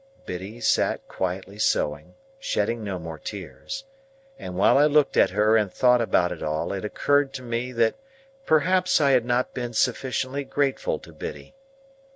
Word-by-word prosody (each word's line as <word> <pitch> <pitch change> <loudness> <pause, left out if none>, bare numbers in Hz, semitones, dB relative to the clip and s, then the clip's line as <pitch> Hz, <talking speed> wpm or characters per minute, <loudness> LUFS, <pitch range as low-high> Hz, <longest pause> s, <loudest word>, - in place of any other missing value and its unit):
Biddy 95 +6 -6
sat 110 - +1
quietly 95 +2 -4
sewing, 75 -8 0 0.2
shedding 115 - -1
no 100 -3 -3
more 80 -2 -7
tears, 100 - -7 0.6
and 90 - -7
while 100 - +5
I 145 - +6
looked 150 -1 +3
at - - +5
her 105 +3 +3
and 105 -4 +2
thought 125 +2 +4
about 90 -6 +2
it - - -6
all, 75 +4 -2
it 95 - -4
occurred 145 +6 +1
to 130 -1 -6
me 120 +1 -3
that 115 -1 +2 0.5
perhaps 185 - +3
I 140 -2 +4
had 125 -3 +3
not 120 +1 0
been 120 -1 -4
sufficiently 130 +4 -1
grateful 135 0 -1
to - - -14
Biddy. - - -8
115 Hz, 165 wpm, -25 LUFS, 95-135 Hz, 0.6 s, I